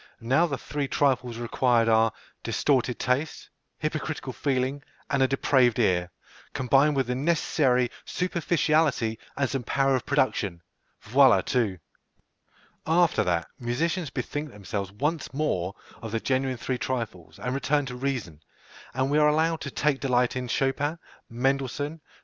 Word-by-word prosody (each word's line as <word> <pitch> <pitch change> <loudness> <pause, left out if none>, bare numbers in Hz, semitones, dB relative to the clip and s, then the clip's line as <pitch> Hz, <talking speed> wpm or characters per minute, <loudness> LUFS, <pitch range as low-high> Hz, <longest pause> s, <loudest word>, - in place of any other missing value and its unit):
Now 135 +9 +2
the 140 -4 -3
three 145 +3 -3
trifles 130 -4 +1
required 120 0 +2
are 115 0 +4 0.3
distorted 130 -4 +1
taste, 135 +5 -2 0.3
hypocritical 155 -3 -3
feeling, 135 +1 -1 0.3
and 140 -2 +2
a 130 - +5
depraved 130 -3 +3
ear, 90 -6 +2 0.4
combined 140 +3 +3
with 135 -1 +1
the 125 - -2
necessary 130 -3 +1
superficiality 160 -9 +1 0.2
and 140 -1 +1
some 135 0 -2
power 135 +3 +1
of 130 - -3
production. 105 - 0 0.4
Voilà 130 +3 +5
tout! 115 -8 0 1.1
After 170 +1 +3
that, 85 -3 0
musicians 160 +7 -1
bethink 145 +3 -4
themselves 100 -2 -5
once 145 +7 -2
more 100 - -1 0.3
of 110 -2 -6
the 115 - 0
genuine 130 +1 0
three 125 +1 -3
trifles, 115 -9 -4
and 125 +5 -3
return 140 +1 +1
to 125 -1 -6
reason, 125 - -3 0.5
and 130 +1 0
we 150 - +4
are 150 - +5
allowed 160 +2 +1
to 140 - -4
take 140 0 0
delight 125 -2 +1
in 125 -1 -3
Chopin, 140 +5 0 0.3
Mendelssohn, 135 +5 -1
Fr. - - -37
130 Hz, 145 wpm, -26 LUFS, 120-145 Hz, 1.1 s, a